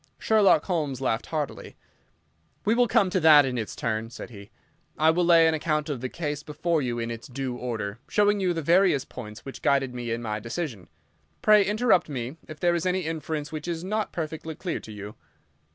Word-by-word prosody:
Sherlock 205 -8 +4
Holmes 150 -8 -1
laughed 125 -3 -1
heartily. 155 -3 -4 0.9
"We 215 - +3
will 245 +1 +3
come 215 -5 +3
to 185 - +2
that 155 -3 +7
in 130 -1 -2
its 110 -3 -4
turn," 110 0 -2
said 120 0 -9
he. 100 -2 -11 0.5
"I 160 +1 +5
will 175 +2 +1
lay 170 -1 +6
an 160 - +3
account 155 0 -1
of 135 -5 -3
the 130 - -3
case 150 -2 -4
before 155 +2 -1
you 120 -3 -2
in 115 0 -3
its 115 0 -7
due 130 -1 -4
order, 115 -3 -4
showing 205 0 +3
you 185 -2 +1
the 165 -2 -2
various 170 -4 +3
points 105 -4 -10
which 135 - -8
guided 135 -2 +2
me 120 -1 -5
in 115 +1 -2
my 105 -1 -2
decision. 115 - -5 0.6
Pray 210 -1 +6
interrupt 210 -3 +2
me 130 +1 -5
if 155 -1 -9
there 175 -1 +2
is 170 +1 0
any 185 +1 +1
inference 155 -2 -4
which 155 +1 -6
is 170 -1 -3
not 210 +3 -2
perfectly 160 -1 -5
clear 175 0 -3
to 110 - -11
you. 105 0 -8
150 Hz, 205 wpm, -26 LUFS, 125-175 Hz, 0.9 s, that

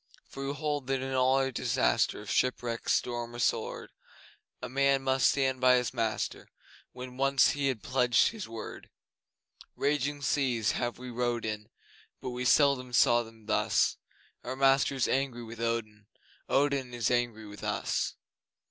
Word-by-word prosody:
For 135 0 -6
we 140 - -2
hold 145 -2 -2
that 135 -1 0
in 135 0 -4
all 130 +1 +2
disaster - - +1
Of 105 - -6
shipwreck, 120 -2 -1
storm, 120 -1 -1
or - - -6
sword, 120 - -1 0.7
A - - -5
man 140 +1 +2
must 130 -1 +3
stand 130 -2 0
by 130 0 +6
his 125 0 0
master 115 -3 -2 0.4
When 125 0 -9
once 135 0 +4
he 145 -1 -1
had 130 -6 -2
pledged 125 -2 +3
his 215 -4 -7
word! 115 -1 -8 0.9
Raging 145 0 -1
seas 125 -7 +1
have 120 -1 -2
we 125 0 -8
rowed 120 -1 -1
in, 105 -1 -4 0.5
But 130 - -5
we 125 +1 -4
seldom 130 -2 +3
saw 120 0 +5
them 115 -1 -13
thus; 110 - +1 0.5
Our 130 +2 -4
master 135 +1 +3
is 130 - +1
angry 130 -3 -1
with 115 0 -9
Odin 110 -3 -3 0.4
Odin 135 -3 +1
is 120 0 0
angry 120 -3 0
with 105 -1 -11
us! - - -1
125 Hz, 155 wpm, -29 LUFS, 115-135 Hz, 0.9 s, by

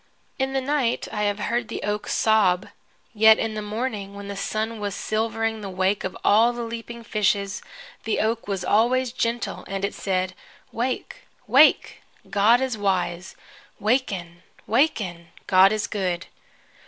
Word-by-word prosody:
In 265 0 -1
the 270 - +1
night 265 -3 0
I 210 -1 -1
have 205 -1 0
heard 235 +2 -1
the - - -6
oak 210 +1 -2
sob. 200 -5 +2 0.5
Yet 220 0 +7
in 225 -1 -2
the 215 - -4
morning, 210 -2 -4
when 200 0 -8
the 200 - -5
sun 220 +3 -3
was 205 -1 -3
silvering 225 0 -1
the 200 - -5
wake 190 +2 0
of 185 - -4
all 225 +4 +5
the 240 0 -4
leaping 230 0 -7
fishes, 200 -3 0 0.4
the 220 - -1
oak 225 0 -1
was 195 -3 -3
always 245 +4 +2
gentle, 235 0 -2
and 195 0 -2
it 200 - -4
said, 185 -1 -1 0.4
"Wake, 250 +2 -3 0.3
wake! - - +4 0.3
God 215 +5 +4
is 255 -5 -2
wise. 185 -2 -1 0.4
Waken, 195 -7 -1 0.2
waken! 210 - 0 0.2
God 190 +1 +6
is 215 -1 0
good!" 185 -4 -2
215 Hz, 155 wpm, -24 LUFS, 195-230 Hz, 0.5 s, Yet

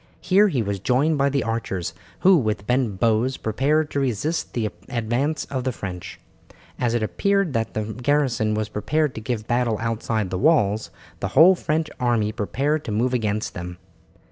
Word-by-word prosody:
Here 195 +3 +4
he 135 - 0
was 100 -1 -3
joined 140 - +1
by 140 0 +3
the 140 0 0
archers, 100 -6 -3 0.3
who 190 0 +7
with 110 - 0
bent 125 -5 0
bows 115 +4 +2
prepared 150 +7 0
to 140 - -1
resist 135 +5 -1
the 110 -3 -1 0.2
advance 125 +5 -1
of 130 -2 -3
the 130 - 0
French. 90 -6 -7 0.6
As 120 -1 +1
it 115 - 0
appeared 195 - +1
that 115 -1 -2
the 110 - 0
garrison 120 -1 0
were 110 0 -1
prepared 140 +8 -1
to 110 - -7
give 110 -2 -3
battle 120 -2 +1
outside 110 -3 -2
the 90 - -2
walls, 110 - +2 0.3
the - - -2
whole 170 +5 +9
French 160 -3 -1
army 115 -4 +1
prepared 140 +9 -1
to - - -4
move 120 +5 0
against 110 -3 -1
them. 90 0 -7
120 Hz, 175 wpm, -23 LUFS, 110-145 Hz, 0.6 s, whole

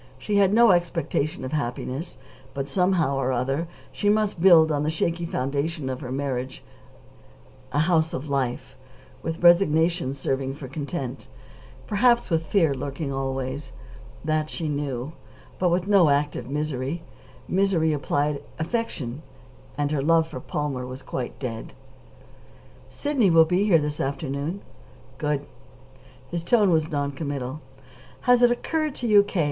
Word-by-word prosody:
She 205 -1 -1
had 195 -1 +4
no 230 0 +6
expectation 170 -5 0
of 130 - -5
happiness, 140 +2 -3 0.4
but, 135 0 -3
somehow 175 -4 +1
or 130 -1 0
other, 135 +6 -1 0.2
she 205 - 0
must 210 -4 +1
build 165 -4 +7
on 145 -1 0
the 150 - 0
shaky 170 +2 -1
foundation 140 +1 -2
of 130 - -5
her 125 -3 -6
marriage 130 -1 -3 1.1
a 145 - -2
house 165 -1 +2
of 150 -3 -5
life, 135 -3 -2 0.5
with 165 +3 -4
resignation 165 -5 +4
serving 135 0 -2
for 140 -2 -8
content, 140 -1 -5 0.6
perhaps 235 0 +3
with 160 -1 +1
fear 165 -7 +3
lurking 140 +2 -4
always. 135 +1 -3 0.5
That 155 0 0
she 160 - -4
knew. 145 -1 -3 0.5
But 180 - +3
with 175 +2 0
no 195 -6 +5
active 140 -3 0
misery. 150 +2 -3 0.4
Misery 180 -4 +2
implied 145 0 -1 0.2
affection, 155 - -3 0.6
and 145 0 0
her 150 -3 0
love 165 +2 +3
for 130 - -7
Palmer 140 -1 -3
was 130 +1 -8
quite 125 -2 -5
dead. 115 -4 -6 1.2
"Sidney 280 -9 +1
will 165 -1 +6
be 180 +5 +1
here 190 -6 +5
this 150 -1 -2
afternoon." 140 +6 -3 0.6
"Good." 150 -1 -1 0.9
His 170 -1 -3
tone 205 +1 +4
was 160 -1 +2
non 145 -2 -1
committal. 140 -1 -4 0.6
"Has 245 -1 +4
it 245 - +7
occurred 305 +4 -1
to 245 - -3
you, 210 -2 +7
K. 200 -2 -3
155 Hz, 145 wpm, -25 LUFS, 135-175 Hz, 1.2 s, build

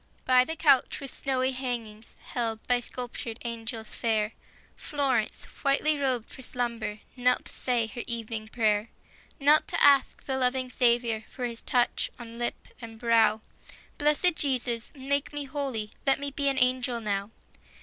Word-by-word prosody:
]Y 255 -1 +7
the 320 +5 -4
couch 290 -5 +4
with 275 -2 -7
snowy 260 -1 0
hangings, 235 -4 -5
Held 225 -3 -3
by 245 -1 +3
sculptured 245 -2 -6
angels 225 -1 -5
fair, 215 -2 0 0.4
Florence, 270 -7 -1 0.2
whitely 280 +2 +3
robed 255 -5 0
for - - -10
slumber, 235 -4 -3
Knelt 250 0 +2
to - - -7
say 245 -3 0
her 240 +2 -6
evening 225 -2 -3
prayer; 215 -1 +1 0.5
Knelt 295 +2 +5
to - - -1
ask 280 -1 +5
the 265 -1 -1
loving 255 0 +1
Saviour 235 -3 +2
For 250 - -4
His 235 -1 -5
touch 245 -1 +1
on 235 -1 -9
lip 240 - -3
and 225 -1 -9
brow: 225 -2 +4 0.3
" - - -21
Blessed 300 +4 +4
Jesus, 245 -4 -1
make 280 +1 -1
me 290 0 -2
holy; 265 -7 -3 0.2
Let 270 - +4
me 280 0 -3
be 280 0 +1
an 270 - -1
angel 250 -1 +2
now." 200 -2 -2
245 Hz, 160 wpm, -28 LUFS, 230-270 Hz, 0.5 s, Y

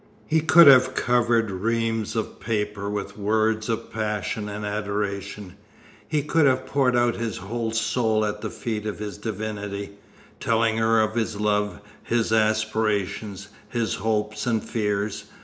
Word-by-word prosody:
He 160 +1 +2
could 165 +2 +7
have 130 -2 +7
covered 120 -3 +2
reams 115 +3 -1
of 110 - -3
paper 105 -2 -2
with 105 0 -5
words 110 +2 +1
of 115 - -3
passion 105 -1 -2
and 105 +1 -5
adoration; 100 -2 -3 0.5
he 150 -2 0
could 150 0 +3
have 130 0 +2
poured 130 -2 +2
out 120 0 +2
his 115 -2 -3
whole 115 +4 -3
soul 110 -1 +1
at 105 0 -3
the - - -3
feet 110 -2 -4
of 105 - -4
his 105 -1 -6
divinity, 105 -2 -4 0.5
telling 110 -1 +1
her 115 0 +3
of 110 0 0
his 110 -2 -2
love, 105 -1 0 0.2
his 115 -1 0
aspirations, 110 -2 0 0.2
his 115 -3 -1
hopes 105 +2 -1
and 115 -3 +1
fears. 105 -2 -2
110 Hz, 150 wpm, -24 LUFS, 105-115 Hz, 0.5 s, could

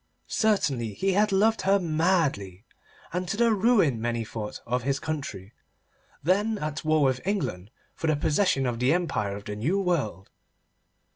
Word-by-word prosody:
Certainly 140 - 0
he 195 - 0
had 210 +2 +3
loved 220 +3 +3
her 195 +1 +3
madly, 155 - 0 0.5
and 180 +1 -2
to 200 - -2
the 235 0 +4
ruin, 200 - +3
many 120 -1 -1
thought, 105 -1 -6
of 125 +2 -1
his 135 +2 -1
country, 115 -10 -5 0.7
then 205 +7 +1
at 155 -4 -4
war 155 -1 +3
with 130 -2 +1
England 170 - -2 0.2
for 165 - -4
the 155 - +3
possession 145 -1 +1
of 120 -2 -2
the 125 +4 +3
empire 105 - -1
of 100 - -9
the 105 -2 -5
New 155 - 0
World. 140 - -2
155 Hz, 160 wpm, -26 LUFS, 115-190 Hz, 0.7 s, the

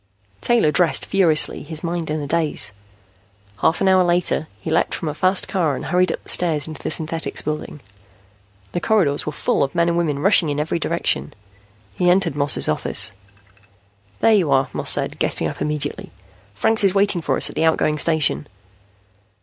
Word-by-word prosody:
Taylor 230 -10 +2
dressed 165 +2 +1
furiously, 175 -6 +2
his 160 0 -7
mind 170 -1 -3
in 155 0 -2
a - - -5
daze. 155 -7 0 0.9
Half 160 - 0
an 195 - +2
hour 185 -1 +4
later, 175 -2 0
he 160 - -6
leaped 165 - 0
from 160 - -4
a - - -4
fast 185 +5 +1
car 165 -7 -1
and - - -7
hurried 180 -1 +1
up - - -6
the - - -12
stairs 160 -4 +2
into 155 -2 -8
the - - -4
Synthetics 165 +1 -2
Building. 150 -1 -5 0.9
The 175 - -3
corridors 170 -12 0
were - - -1
full 150 - -1
of 140 +3 -1
men 170 0 +2
and 170 - -1
women 155 -5 -1
rushing 170 0 +3
in 145 0 -2
every 160 +3 -2
direction. 70 - -1 0.6
He 180 - +1
entered 180 -4 +2
Moss's 145 0 +3
office. 75 - +3 1.1
"There 225 - +4
you 185 -8 +2
are," 135 0 +2
Moss - - -2
said, - - +2
getting - - -1
up - - -8
immediately. 150 -1 -4 0.5
"Franks 220 - +1
is 195 -1 +3
waiting 200 -3 +2
for - - -1
us - - +3
at - - -16
the 160 +2 0
outgoing 155 -1 +1
station." 155 -2 +1
160 Hz, 185 wpm, -20 LUFS, 150-180 Hz, 1.1 s, hour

